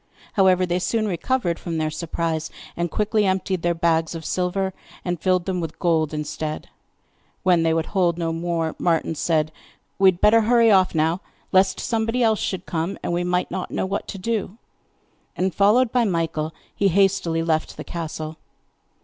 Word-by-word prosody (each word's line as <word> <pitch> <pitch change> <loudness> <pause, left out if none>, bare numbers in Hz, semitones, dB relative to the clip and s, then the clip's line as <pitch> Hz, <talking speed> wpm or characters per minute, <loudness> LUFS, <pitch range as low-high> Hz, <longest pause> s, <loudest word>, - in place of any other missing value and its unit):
However, 185 -3 +4
they 175 0 0
soon 215 +4 0
recovered 185 -1 -1
from 165 -2 -4
their 155 -1 -1
surprise, 160 -1 -2 0.3
and 170 0 -1
quickly 210 +3 +1
emptied 190 -1 0
their 175 0 +1
bags 165 0 +1
of 160 -1 -7
silver, 190 +1 -1 0.3
and 175 -3 -2
filled 185 -2 +2
them 185 -2 -1
with 160 -2 -5
gold 160 -3 +1
instead. 155 0 -4 0.7
When 180 -2 +4
they 165 0 +2
would 160 0 +1
hold 175 -4 +1
no 165 -1 -1
more, 165 -1 -1
Martin 165 -1 +1
said: 155 -1 0 0.5
'We 195 - +6
had 175 - -16
better 225 +2 +6
hurry 230 0 +4
off 185 -3 +4
now 160 +4 +1 0.3
lest 190 0 +3
somebody 225 +2 0
else 220 -2 +3
should 185 -2 -3
come, 165 +3 -2
and - - -1
we 175 +1 0
might 180 0 0
not 185 - -3
know - - -2
what 195 +1 -3
to - - -6
do'; 210 0 -2 0.8
and, 185 0 0
followed 220 +6 +4
by 250 -2 +3
Michael, 165 -5 -1 0.2
he 200 - +2
hastily 185 -3 +2
left 160 -1 -1
the - - -6
castle. 160 -1 -5
175 Hz, 175 wpm, -23 LUFS, 165-195 Hz, 0.8 s, We